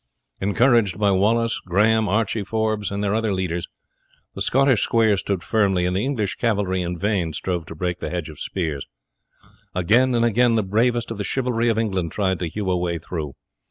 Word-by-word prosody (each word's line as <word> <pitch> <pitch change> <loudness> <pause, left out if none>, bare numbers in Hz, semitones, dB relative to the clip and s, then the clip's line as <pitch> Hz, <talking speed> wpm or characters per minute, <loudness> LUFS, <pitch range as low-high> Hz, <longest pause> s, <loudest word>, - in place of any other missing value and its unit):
Encouraged 110 0 +2
by 105 -1 +2
Wallace, 115 +4 +1
Grahame, 105 +4 +2
Archie 110 +1 0
Forbes, 110 -1 -1
and 100 +1 -3
their 100 0 0
other 110 -1 0
leaders, 90 -3 -2 0.7
the - - -8
Scottish 135 -3 +3
squares 110 -4 +2
stood 95 -2 -2
firmly, 95 -5 +1
and 90 0 0
the 100 - 0
English 120 -8 -2
cavalry 100 -5 0
in 90 0 -3
vain 95 -4 -1
strove 90 -1 -3
to 80 - -8
break 90 +2 -2
the - - -4
hedge 90 -3 -3
of 75 -2 -11
spears. 80 -7 -3 0.9
Again 120 +8 +3
and 120 0 +3
again 120 +1 +3
the 110 - +2
bravest 115 +4 0
of 110 - -5
the - - -1
chivalry 120 0 0
of 115 - +1
England 95 -7 -1
tried 95 -2 0
to 90 - -2
hew 100 +1 -2
a 90 - +1
way 85 -1 -1
through. 80 -4 -6
100 Hz, 195 wpm, -22 LUFS, 90-115 Hz, 0.9 s, Scottish